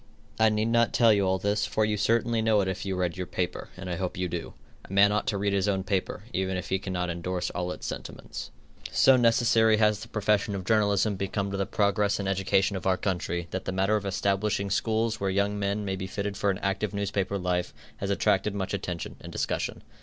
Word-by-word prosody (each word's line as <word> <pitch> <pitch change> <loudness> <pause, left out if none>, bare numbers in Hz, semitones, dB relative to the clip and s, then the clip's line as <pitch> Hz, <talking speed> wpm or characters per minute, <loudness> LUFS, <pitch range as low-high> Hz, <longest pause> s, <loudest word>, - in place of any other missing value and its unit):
I 110 0 +6
need 110 +1 0
not 115 0 +3
tell 115 -3 +6
you 100 -2 +2
all 95 0 +2
this, 105 +2 0
for 110 - +1
you 105 0 0
certainly 115 +2 +1
know 110 -1 +3
it 95 - -1
if 95 +1 -3
you 95 - -1
read 90 -1 -1
your 90 -1 -4
paper, 90 -1 -3
and 95 0 -7
I 90 -1 -2
hope 95 -2 -3
you 90 0 -1
do. 85 -1 -5 0.3
A - - -14
man 100 +1 +5
ought 105 0 0
to 100 - 0
read 100 0 0
his 100 0 +1
own 95 -2 0
paper, 95 0 -2
even 95 0 -1
if 90 - -5
he 95 - +1
cannot 90 -3 -2
endorse 90 +1 -3
all 90 0 -3
its - - -7
sentiments. - - -6 0.4
So 135 - +6
necessary 115 -2 +4
has 105 -1 +3
the 110 - -8
profession 105 -2 +1
of 95 -2 -5
journalism 100 -1 +2
become 100 +1 -2
to 100 - -2
the 95 -1 -1
progress 100 -1 +1
and 100 - -2
education 95 +1 +1
of 95 - -3
our 95 -1 +3
country, 85 -2 -2
that 95 - -4
the - - -2
matter 95 +3 +2
of 105 -2 -1
establishing 100 +1 0
schools 110 +2 0
where 100 - 0
young 100 +2 0
men 100 +1 -1
may 95 -1 -1
be 95 0 -5
fitted 100 +1 -3
for 100 - 0
an 95 - 0
active 100 +1 -1
newspaper 100 -1 -1
life, 90 -1 -1 0.3
has 100 - -3
attracted 100 0 +1
much 95 -1 -3
attention 90 -3 -4
and - - -9
discussion. - - -2
100 Hz, 230 wpm, -27 LUFS, 95-105 Hz, 0.4 s, I